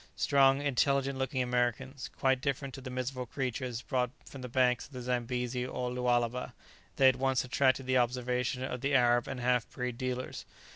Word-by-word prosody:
Strong, 135 -1 +4
intelligent 140 0 +1
looking 130 -1 0
Americans, 125 +2 -1
quite 130 -1 +2
different 135 -1 -2
to 135 - -8
the 130 - -7
miserable 125 0 -3
creatures 125 -2 -3
brought 125 -3 0 0.2
from 135 - -10
the 125 - -6
banks 125 -1 +2
of 145 - -21
the 125 - -6
Zambesi 125 0 -1
and 130 - -7 0.2
Lualaba, 125 0 0 0.4
they 135 - +5
at 130 -1 +4
once 135 0 +1
attracted 130 0 +2
the 130 0 +3
observation 125 +1 0
of 125 -2 -4
the 140 +1 +1
Arab 120 -2 +4
and 135 -2 -4
half 125 -1 +1
breed 125 -2 -4
dealers. 130 0 -3
125 Hz, 180 wpm, -31 LUFS, 125-135 Hz, 0.4 s, they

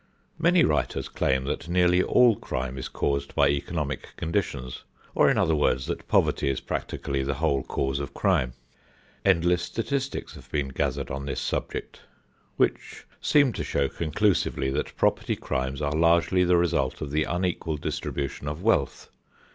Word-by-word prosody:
Many 170 +1 +4
writers 75 -2 0
claim 65 0 0
that 70 +4 -3
nearly 90 0 +4
all 120 +2 +5
crime 65 -7 -4
is 65 - -5
caused 70 0 -2
by 70 -1 +4
economic 70 -1 -3
conditions, 65 -6 -2 0.3
or - - +4
in - - +2
other 80 - +3
words 70 -3 +1
that - - -5
poverty - - +2
is 70 - -1
practically 70 -1 -3
the 70 0 -1
whole 70 -2 +1
cause 65 +1 -2
of 70 - -5
crime. 60 -1 +1 0.7
Endless 90 -2 +3
statistics 130 +7 -3
have - - -13
been 70 -3 -1
gathered 65 - -2
on 70 +1 -4
this 70 - -2
subject - - -4 0.6
which - - -1 0.2
seem 140 -5 +4
to - - -3
show 70 -1 0
conclusively 85 -4 0
that - - -3
property - - +1
crimes 65 +2 -3
are 70 0 0
largely 85 +3 +3
the 90 0 +4
result 70 -7 0
of 70 - -4
the 75 +1 +1
unequal 85 -3 -1
distribution 70 0 -4
of 75 +5 -4
wealth. 95 - +1
75 Hz, 155 wpm, -26 LUFS, 70-90 Hz, 0.7 s, all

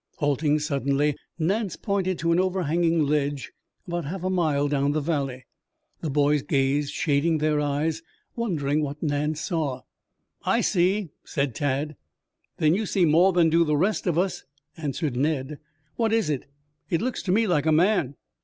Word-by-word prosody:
Halting 145 -1 +1
suddenly, 145 -1 0 0.2
Nance 195 +5 0
pointed 190 -3 -1
to 170 0 0
an 170 - +3
overhanging 170 -3 +1
ledge 145 -1 -1 0.4
about 175 -2 -3
half 180 +5 -5
a 185 - 0
mile 155 -6 +1
down 145 0 +1
the 155 - +1
valley. 140 -5 -2 0.5
The 160 - -3
boys 145 +1 +2
gazed, 140 -1 0
shading 160 +1 +1
their 155 0 +1
eyes, 150 +3 -1 0.3
wondering 155 - 0
what 145 +1 -4
Nance 150 +1 -1
saw. 155 -8 -2 0.6
"I - - +2
see," 185 +1 +1
said 140 -3 -2
Tad. 145 +3 -2 0.6
"Then 155 0 +3
you 210 +3 -1
see 185 -2 +2
more 170 +5 +5
than 170 -3 +3
do 170 +1 +5
the 150 -2 +1
rest 195 +5 0
of 170 -2 +1
us," 185 +2 0 0.3
answered 150 -3 -3
Ned. 145 +1 -1 0.4
"What 225 -2 +1
is 225 -8 +2
it?" 140 -2 -3 0.4
"It 165 - +1
looks 255 +3 -2
to 180 - -2
me 225 +4 +3
like 160 -6 +1
a - - +4
man." 165 -4 +2
155 Hz, 165 wpm, -25 LUFS, 145-175 Hz, 0.6 s, more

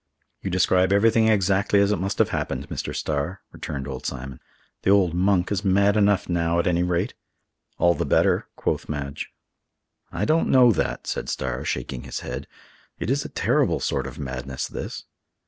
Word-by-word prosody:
"You 95 - -3
describe 95 +1 +3
everything 110 +2 +4
exactly 100 -1 +3
as 100 +1 +3
it 105 - 0
must 95 +2 -2
have - - +3
happened, 70 +2 -3
Mr. - - -4
Starr," 80 +6 -2
returned 70 -2 -5
old 65 -2 -6
Simon. 65 -1 -6 0.4
"The - - 0
old 95 -4 +4
'Monk' 90 +1 +2
is 100 0 -1
mad 100 +1 +3
enough 105 -2 +3
now, 85 -1 +1
at 85 - +1
any 85 -1 +2
rate!" 90 -1 0 0.6
"All 85 0 +4
the 75 - -2
better," - - +2
quoth - - -2
Madge. 70 -2 -4 0.8
"I 95 +5 -1
don't 160 +5 +2
know 125 -2 +6
that," 95 - -2
said - - -3
Starr, 65 -2 -3
shaking 60 - -3
his 65 - -5
head; 65 +3 -6 0.5
"it 115 - -2
is 140 +1 0
a - - -5
terrible - - +1
sort - - -1
of - - -9
madness 65 -1 -4
this." - - -6
90 Hz, 180 wpm, -24 LUFS, 70-100 Hz, 0.8 s, know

